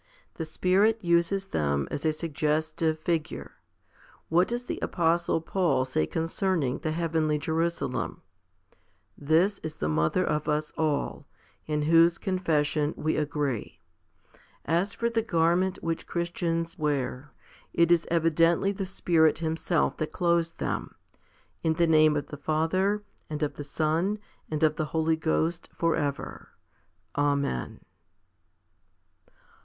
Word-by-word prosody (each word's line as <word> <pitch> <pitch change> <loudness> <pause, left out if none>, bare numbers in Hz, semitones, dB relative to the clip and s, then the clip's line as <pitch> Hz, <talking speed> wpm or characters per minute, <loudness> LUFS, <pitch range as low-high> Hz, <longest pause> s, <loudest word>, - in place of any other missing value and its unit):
The 160 - -5
Spirit 195 +7 +2
uses 170 +3 +1
them 70 -2 0
as 150 - -1
a - - +4
suggestive 155 0 -1
figure. 160 0 -2 0.8
What 175 +3 +4
does 240 +1 -3
the - - -4
apostle 170 -1 +1
Paul 165 -7 +1
say 105 -12 0
concerning 165 -4 -1
the 155 - -2
heavenly 160 -1 0
Jerusalem? 160 -3 -2 0.9
This 165 +7 +2
is 160 -1 -6
the 75 - -2
mother 80 - +1
of 150 0 -1
us 150 0 -1
all, 150 -3 -1 0.4
2 155 - -3
in 150 - +1
whose 165 +2 +5
confession 155 -5 0
we 155 +1 0
agree. 145 - -2 0.9
As 175 +6 0
for 235 - 0
the 230 -1 +1
garment 180 -1 +2
which 165 -1 -2
Christians 170 0 -2
wear, 140 -2 -2 0.4
it 170 0 +3
is 170 -1 +3
evidently 165 +3 +3
the 195 -1 -4
Spirit 165 -4 +3
Himself 160 +1 0
that 155 -1 -3
clothes 170 -1 +1
them, - - -4 0.7
in 160 - +2
the 170 +1 +2
name 155 -2 +5
of 145 - -2
the 150 - -7
Father 185 +8 0 0.3
and 150 0 -3
of 150 - -1
the 145 - -7
Son 160 +7 0 0.3
and 155 0 -2
of 155 -1 +3
the 155 - 0
Holy 160 0 +2
Ghost 160 +1 -1
for 165 -1 +1
ever. 145 -2 -4 0.7
Amen. 140 - 0
160 Hz, 130 wpm, -27 LUFS, 150-170 Hz, 0.9 s, whose